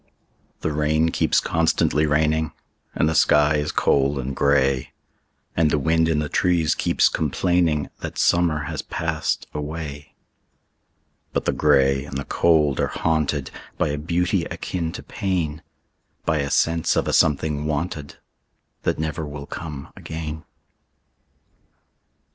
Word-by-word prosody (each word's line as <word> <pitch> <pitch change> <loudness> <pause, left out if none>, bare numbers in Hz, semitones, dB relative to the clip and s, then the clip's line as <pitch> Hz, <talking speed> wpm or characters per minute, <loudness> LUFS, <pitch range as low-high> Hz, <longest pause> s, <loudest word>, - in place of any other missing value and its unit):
The 80 - -1
rain 80 +2 +2
keeps - - +2
constantly 80 -1 +1
raining, 80 +1 +1 0.4
And 75 - +2
the 80 - +1
sky 75 0 +4
is 75 +1 -1
cold 70 +1 +2
and 65 0 -4
gray, 70 -2 +2 0.6
And 80 -2 +3
the 75 - +2
wind 80 +3 +2
in 80 - +1
the 75 0 0
trees 85 -2 +2
keeps - - +2
complainingThat 80 0 0
summer 85 -4 +2
has 75 0 -4
passed 80 -1 -2
away;—But 75 -1 -9
the - - +2
gray 70 0 +3
and 70 -1 -6
the 70 - -4
cold 75 -5 +2
are - - +2
hauntedBy 80 -3 -1 0.4
a - - -2
beauty 85 +3 0
akin 85 -3 -4
to - - -7
pain,—By 80 -3 -4
a 70 0 -1
sense 80 +2 +2
of - - 0
a - - 0
something 75 -1 +2
wanted, 75 -1 -3 0.7
That - - 0
never 80 0 -3
will 75 -1 -7
come 75 -4 -7
again. 80 -1 -6
75 Hz, 125 wpm, -23 LUFS, 75-80 Hz, 0.7 s, sky